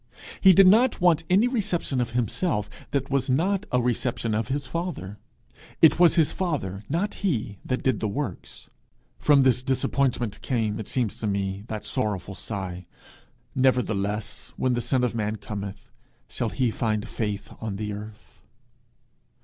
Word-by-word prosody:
He 190 - +8
did 195 +2 +7
not 225 +7 +5
want 170 -3 +3
any 200 +6 +5
reception 190 - -1
of 120 -1 -3
himself 115 - -1 0.2
that 140 -1 -2
was 135 -1 +1
not 190 +9 +1
a 125 - +3
reception 120 -1 -1
of 110 +1 0
his 140 +1 -2
father. 165 - -4 0.6
It 160 +1 +6
was 175 -1 +6
his 160 -4 +4
father, 125 - -3
not 180 +8 0
he, 115 - -1
that 125 - -2
did 130 -5 +1
the 110 - -1
works! 105 -2 -5 0.5
From 145 -2 +5
this 125 -2 +3
disappointment 130 -3 0
came, 110 -5 -1
it 110 - -6
seems 120 -6 -1
to 110 - -2
me, 100 0 -2
that 110 -2 -5
sorrowful 100 -3 -2
sigh, 95 -3 -5 0.7
'Nevertheless, 110 -6 0
when 130 - +1
the 120 - 0
son 130 +1 +1
of 125 - +1
man 110 -1 -1
cometh, 100 0 -7 0.4
shall 120 -3 -2
he 125 0 0
find 110 -3 -1
faith 105 -2 -4
on 110 -3 -3
the 105 +1 -4
earth?' 105 +1 -10
120 Hz, 155 wpm, -25 LUFS, 105-145 Hz, 0.7 s, He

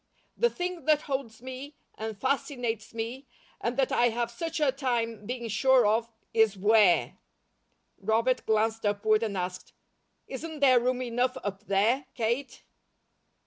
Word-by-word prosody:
The 475 - +3
thing 360 -4 -4
that 305 -1 +3
holds 260 -5 -4
me, 260 +3 -8 0.2
and 220 -1 -5
fascinates 245 -4 -2
me, 235 +4 -5 0.3
and 240 +2 -2
that 270 -2 +2
I 240 0 +4
have 235 +1 -2
such 330 +6 -4
a 295 -3 +3
time 230 -6 -2
being 245 -1 -4
sure 250 +3 +4
of, 225 +2 +1 0.2
is 220 -3 +3
'where.'" 205 -2 +4 0.8
Robert 230 +3 +1
glanced 220 +1 +1
upward 215 +1 +2
and 210 -4 -2
asked: 180 0 -5 0.5
"Isn't 310 +3 -6
there 260 -3 +6
room 255 +1 0
enough 250 +2 0
up 205 +1 -5
there, 225 +8 +2
Kate?" 235 +4 -2
235 Hz, 145 wpm, -28 LUFS, 220-265 Hz, 0.8 s, there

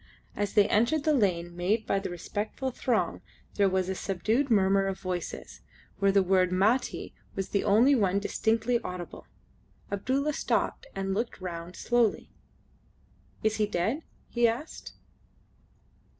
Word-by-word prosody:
As 205 -1 -2
they 205 -1 +6
entered 240 +8 +2
the 310 - +3
lane 175 -8 +1
made 205 +6 0
by 195 - +1
the 195 - -4
respectful 205 +9 -4
throng 240 -2 -1 0.3
there 200 -2 +3
was 185 -1 0
a 190 - -1
subdued 220 +9 0
murmur 195 -2 +3
of 195 0 -3
voices, 180 -2 -5 0.4
where 195 0 +4
the 195 0 +4
word 185 -1 +3
"Mati" 210 +8 +1 0.2
was 195 - -3
the 200 - 0
only 230 +8 +5
one 200 -7 +2
distinctly 225 +3 +1
audible. 180 -5 -7 0.6
Abdulla 270 +9 0
stopped - - -1
and 195 0 -2
looked 230 +4 -2
round 175 -1 -6
slowly. 240 -3 +1 1.1
"Is 220 0 +1
he 210 -1 +2
dead?" 210 - -1 0.3
he 240 -1 +3
asked. 235 +8 -5
200 Hz, 140 wpm, -28 LUFS, 190-235 Hz, 1.1 s, they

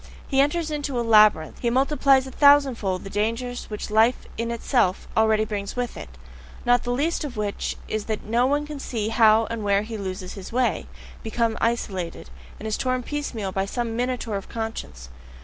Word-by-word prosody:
He 270 -1 +3
enters 310 +3 0
into 285 -4 -2
a 235 - -1
labyrinth, 210 -8 +5
he 240 - 0
multiplies 270 +1 +3
a 265 - -8
thousandfold 265 -10 +4
the 195 - -7
dangers 230 +4 -2
which 210 0 -5
life 225 +3 +3
in 230 0 -2
itself 235 -4 0
already 220 -1 +3
brings 205 -2 -4
with 245 -1 -3
it; - - -8 0.6
not 245 0 +4
the 245 - -5
least 305 +7 0
of 270 -6 -6
which 205 -1 -2
is 215 -1 -3
that 220 -1 -3
no 235 +4 +2
one 290 +2 +1
can 295 -1 -7
see 220 -5 -3
how 225 0 +5
and 230 -2 -3
where 200 0 +2
he 220 0 -6
loses 185 -1 -5
his 195 -2 -9
way, 250 +1 0 0.3
becomes 225 0 -1
isolated, 190 - -2 0.3
and 220 - -5
is 215 - -1
torn 255 -1 -1
piecemeal 240 -9 -4
by 195 +1 -1
some 230 +1 -3
minotaur 245 -3 -2
of 195 - -9
conscience. 220 - -6
230 Hz, 185 wpm, -24 LUFS, 210-255 Hz, 0.6 s, labyrinth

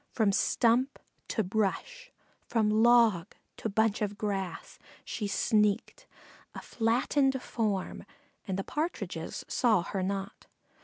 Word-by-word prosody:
From 215 -4 +2
stump 240 +6 +2 0.3
to 220 - -1
brush, 220 - -2 0.4
from 215 -2 +1
log 220 -4 +4 0.2
to 225 - -3
bunch 220 +1 +1
of 205 -1 -2
grass 195 -4 -4 0.3
she 210 - -3
sneaked, 210 - 0 0.5
a - - -6
flattened 260 +4 +1
form, 215 -7 -3 0.4
and 190 -1 -2
the 195 - -2
Partridges 315 - -4
saw 220 -8 +2
her 195 +2 -3
not. 195 +1 -4
215 Hz, 115 wpm, -29 LUFS, 200-240 Hz, 0.5 s, log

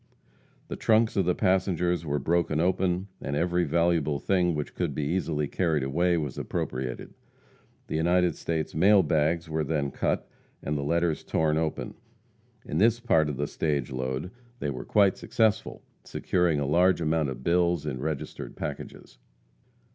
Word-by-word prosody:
The - - -5
trunks 110 0 +2
of 95 -4 +2
the 90 - +2
passengers 90 -3 +1
were 75 0 0
broken 80 +1 +1
open, 90 +1 +1
and 70 - -3
every 85 +2 +1
valuable 85 -2 +1
thing 90 +2 +1
which 75 -1 -4
could - - -2
be 75 - -1
easily 75 -2 -1
carried 80 -3 0
away 85 +6 +1
was 75 -4 -3
appropriated. 65 -1 -4 0.7
The - - -3
United 85 0 +2
States 80 -2 -3
mail 95 +4 +5
bags 80 +2 +1
were 80 0 -1
then 75 -2 -1
cut - - -1 0.4
and 75 - -2
the 70 - -1
letters 85 +2 0
torn 80 -1 +1
open. 80 -1 -3 0.7
In 75 - -2
this 115 +3 +4
part 80 -11 +2
of 70 - -4
the 75 - 0
stage 70 -3 -2
load 65 +6 -3 0.3
they 75 - -2
were 65 - -6
quite 100 -2 +3
successful, 110 -3 0 0.2
securing 90 -5 0
a 70 - -1
large 90 +6 +3
amount 80 -2 +1
of 65 -1 -7
bills 85 -1 +2
in 70 -4 -3
registered 75 +1 -5
packages. - - -7
80 Hz, 160 wpm, -27 LUFS, 75-90 Hz, 0.7 s, mail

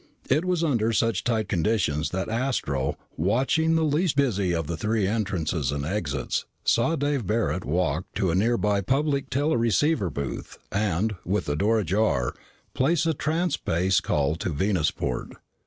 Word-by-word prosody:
It 155 +6 +3
was 180 -2 +1
under 115 -8 +1
such 115 +1 +1
tight 115 -2 0
conditions 85 -4 0
that 95 +3 -3
Astro, 110 - -1 0.2
watching 130 - +2
the 160 - +2
least 155 +2 +1
busy 105 -10 +1
of 80 -2 -1
the 85 - -3
three 105 +2 0
entrances 90 - -1
and 70 0 -3
exits, 105 +6 -2 0.2
saw 140 +8 +2
Dave 145 - -1
Barret 105 -4 0
walk 85 +1 0
to 95 -3 +1
a - - 0
nearby 105 -1 +2
public 140 +5 0
teleceiver 135 - +2
booth, 70 -2 -5
and, 105 +1 0
with 100 +4 -1
the 75 - -1
door 105 +8 +2
ajar, 95 - +1 0.4
place 155 +5 +2
a 165 - +2
transspace 140 - 0
call 75 +1 0
to 90 - -3
Venusport. 80 -7 -1
105 Hz, 150 wpm, -25 LUFS, 85-135 Hz, 0.4 s, It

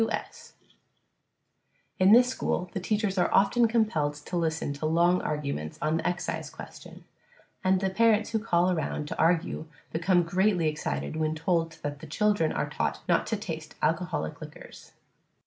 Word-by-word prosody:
W. 225 - +1
S. - - -15 1.5
In 185 +2 +6
this 245 +3 +7
school 180 -7 -2
the - - -2
teachers 205 0 -1
are - - +2
often 230 +5 +4
compelled 210 -11 +1
to 150 +4 -7
listen 160 -3 -1
to 150 +2 -3
long 170 +3 +3
arguments 140 - -3
on 155 +1 0
the - - -2
excise 175 0 -3
question, - - -11 0.6
and 185 0 +3
the 190 -1 0
parents 220 +1 +3
who 225 - +1
call 185 -4 +2
around 160 -3 -2
to - - -6
argue 165 -1 +1 0.3
become 175 +2 +3
greatly 180 0 +1
excited 70 - -3
when 155 0 0
told 165 0 0
that 145 -1 -4
the 160 - -10
children 205 0 +1
are 150 - -1
taught 150 - -2
not 175 -2 +2
to 220 - -1
taste 160 -6 -7
alcoholic 160 - -1
liquors. - - -12
175 Hz, 165 wpm, -28 LUFS, 155-195 Hz, 1.5 s, this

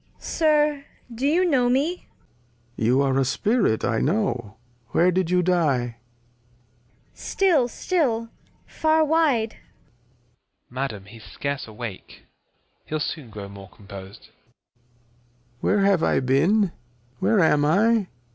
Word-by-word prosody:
Sir, 300 -3 +1 0.3
do 255 +5 -1
you 345 +5 +3
know 260 -8 +2
me? 290 +8 0 0.7
Lear. 110 - -2
You 130 +3 +3
are 135 -1 +1
a - - +3
Spirit, 140 - +1
I 115 -2 0
know; 135 - -1 0.4
where 180 +2 +4
did 180 -1 0
you 180 0 +2
die? 140 -10 +1 1.2
Cord. - - -23
StiU, 325 -11 +2
still, 240 -9 -1 0.4
far 315 0 +2
wide. 290 -8 +2
Phys. 120 - -31
Madam 125 -6 -4
he's 110 +2 -14
scarce 140 -2 -4
awake; 110 -2 -9 0.6
he'U 155 - -3
soon 150 -3 -4
grow 100 -2 -8
more 100 -1 -12
compos'd. 100 0 -12 1.3
Lear. - - +2
Where 195 - +2
have 195 -4 +3
I - - +2
been? 165 +10 +2 0.5
Where 220 - +2
am 150 -4 +4
I 205 +6 +3
170 Hz, 130 wpm, -24 LUFS, -, 1.3 s, where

